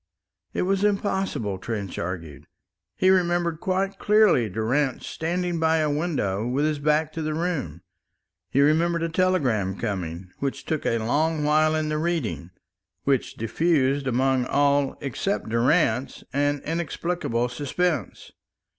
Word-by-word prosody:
It - - 0
was 195 +2 +1
impossible, 190 - 0
Trench 100 -3 -4
argued. 85 -5 -6 0.5
He 185 - +4
remembered 175 -3 +1
quite 190 +2 -1
clearly 210 - +4
Durrance 125 +7 0
standing 175 +1 -2
by 160 0 +3
a 155 -2 +1
window 145 - -1
with 135 +4 +1
his 155 -1 0
back 150 +1 +1
to 165 - -4
the 155 0 -2
room. 150 - -2 0.7
He 140 - +2
remembered 165 +3 +3
a 165 - 0
telegram 135 - +1
coming 90 -4 -4
which 135 -1 -3
took 155 -2 -2
a 115 - +2
long 150 +7 0
while 155 +1 +3
in 155 -1 -1
the 155 0 -1
reading 155 - -2 0.5
which 135 -3 0
diffused 140 +3 +1
among 130 0 +1
all 140 -1 +2
except 140 - -2
Durrance 115 +1 +1
an 145 0 0
inexplicable 165 -6 -1
suspense. 145 +7 -2
150 Hz, 135 wpm, -25 LUFS, 120-170 Hz, 0.7 s, He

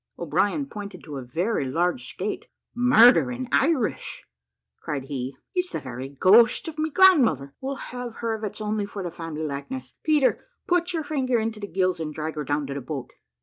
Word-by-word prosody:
O'Brien 190 - 0
pointed 205 -7 -8
to 150 -3 -7
a - - -4
very 160 - -1
large 180 - 0
skate - - -4 0.3
"Murder 245 0 +6
in 250 +1 -4
Irish!" 275 -5 0 0.5
cried 145 -3 -4
he, 135 -1 -5 0.2
"it's 360 -1 0
the - - -1
very 130 -1 -6
ghost 205 - +5
of 325 - -4
of 310 - -11
my 310 +1 +1
grandmother: 280 - +5
we'll 270 +1 -3
have 245 -3 -7
her 230 -1 -2
if 220 - -9
it's 210 +1 -5
only 210 -1 -1
for 200 -1 -6
the 175 - -4
family 160 -2 -6
likeness. 140 -3 -5
Peter, 300 -3 +2 0.2
put 355 0 +1
your 325 -2 -2
finger 265 -5 0
into 220 -1 -2
the 205 - -5
gills, 185 -1 0
and 155 -2 -4
drag 155 0 -3
her 150 - -4
down 145 +1 -1
to 140 - -5
the 140 - -4
boat." 135 -2 -6
200 Hz, 195 wpm, -25 LUFS, -, 0.5 s, Murder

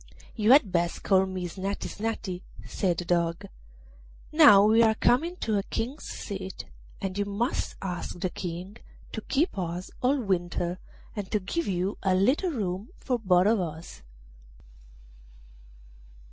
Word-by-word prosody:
'You 215 +1 +3
had 255 -9 +5
best 175 -1 0
call 190 -1 +4
me 185 -1 -4
Snati 195 +3 -4
Snati,' 210 -4 -4 0.2
said 180 -4 -1
the 175 - -3
Dog. 170 -1 0 0.9
'Now 220 -11 +8
we 220 +2 +5
are 220 -1 +4
coming 320 +11 +2
to 215 -2 +1
a - - 0
King's 245 +8 -4
seat, 190 -2 -6 0.3
and 195 0 -3
you 205 - +1
must 205 +6 -2
ask 180 -1 -4
the 180 0 -1
King 180 +4 -6 0.3
to 220 - -5
keep 290 - 0
us 175 +1 -4
all 270 +3 +2
winter, 175 -4 -1 0.4
and 205 -3 -4
to 210 - +1
give 255 - -3
you 185 +1 -1
a 190 -2 +2
little 260 - +2
room 200 - -3
for 250 -2 -1
both 185 -4 +4
of 220 +1 +4
us. 160 -2 -6
195 Hz, 145 wpm, -27 LUFS, 180-225 Hz, 0.9 s, Now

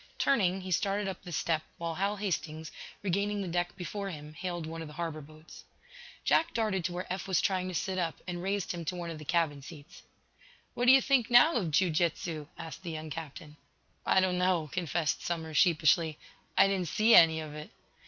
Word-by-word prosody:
Turning, 195 -8 +2
he 185 0 -7
started 200 +3 0
up 190 - -5
the 180 - -9
step, 160 -1 0 0.2
while 170 -1 -3
Hal 200 +4 -1
Hastings, 160 -6 -3 0.3
regaining 200 +2 0
the - - -5
deck 175 0 -1
before 195 +2 -4
him, 150 -3 -8
hailed 175 0 -4
one 165 +1 -6
of 160 - -6
the 150 - -11
harbor 165 -2 -4
boats. 155 +2 -14 0.6
Jack 330 +1 +2
darted 215 -5 0
to - - -1
where 180 +1 -4
Eph 190 +1 -5
was 185 -4 +2
trying 185 -4 0
to 185 - -5
sit 185 +2 -1
up, 165 -3 -1
and 175 -1 -4
raised 195 0 -1
him 175 -1 -5
to 180 - -2
one 170 -1 -5
of 160 - -7
the 150 - -10
cabin 160 -3 0
seats. 150 +3 -12 0.7
"What 245 - -1
do 250 - +8
you 265 0 +7
think, 260 -4 +2
now, 245 +7 +7
of 190 - 0
jiu 170 +4 +2
jitsu?" 160 -1 -1
asked 165 0 -8
the 180 - -6
young 155 -1 -6
captain. 155 0 -8 0.5
"I - - +4
don't 180 -1 +1
know," 180 -5 +1
confessed 170 -3 -1
Somers, 160 -3 -3
sheepishly. 160 -3 +3 0.4
"I - - +8
didn't 190 -3 -1
see 215 +8 +3
any 160 -1 +7
of 155 -2 -7
it." 150 0 -8
175 Hz, 210 wpm, -30 LUFS, 160-190 Hz, 0.7 s, do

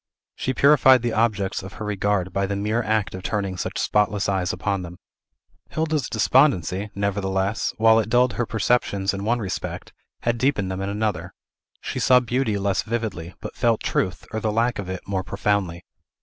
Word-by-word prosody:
She 130 - -2
purified 130 -2 +6
the 120 -2 -1
objects; 105 -4 0
of 95 0 -9
her 105 - -6
regard 100 -3 -1
by 100 0 0
the 100 - -2
mere 105 +4 0
act 110 -4 0
of 95 - -6
turning 100 -1 -2
such 90 - -4
spotless 105 -1 +1
eyes 95 -2 0
upon 100 -2 -2
them. 90 0 -9 0.7
Hilda's 155 -4 -1
despondency, 105 - +2
nevertheless, 100 0 -1
while 110 0 +5
it 110 - -2
dulled 125 0 +3
her 115 +4 -2
perceptions 100 -3 +1
in 100 0 -4
one 120 +2 +2
respect, 100 -5 -5 0.3
had 120 0 0
deepened 110 -8 +1
them 95 +1 -4
in 100 - -2
another; 105 +1 -2 0.5
she - - -4
saw 125 -1 +5
beauty 120 -3 -1
less 100 -1 0
vividly, 110 -7 -4
but - - -7
felt 115 -2 +1
truth, 90 -4 -1
or 110 - -1
the 110 0 -1
lack 115 +2 +1
of 95 -2 -5
it, 95 0 -6
more 95 -1 -1
profoundly. 100 -3 -1
105 Hz, 180 wpm, -23 LUFS, 95-115 Hz, 0.7 s, purified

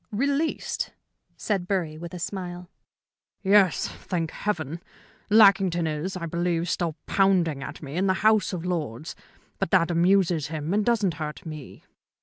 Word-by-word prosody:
"Released?" 280 +8 -1 0.4
said 195 -4 -1
Bury, 175 -6 -1
with 170 +2 -8
a - - -5
smile. 180 0 -5 0.7
"Yes, 195 -2 +4
thank 165 -4 -4
Heaven. 165 -5 -3 0.5
Lackington 195 -5 +5
is, 160 +5 -3
I 170 - -4
believe, 170 0 -1
still 170 -3 -1
pounding 180 -7 +2
at 135 - -7
me 145 +3 -6
in 195 +2 +2
the 185 - +3
House 215 -2 +4
of 180 -2 -4
Lords. 155 -6 -3 0.4
But - - -1
that 175 -2 +3
amuses 175 -2 +3
him 155 +2 -3
and 210 +1 +2
doesn't 210 -6 +2
hurt 150 +2 -5
me." 155 -4 -9
175 Hz, 145 wpm, -26 LUFS, 160-195 Hz, 0.7 s, Lackington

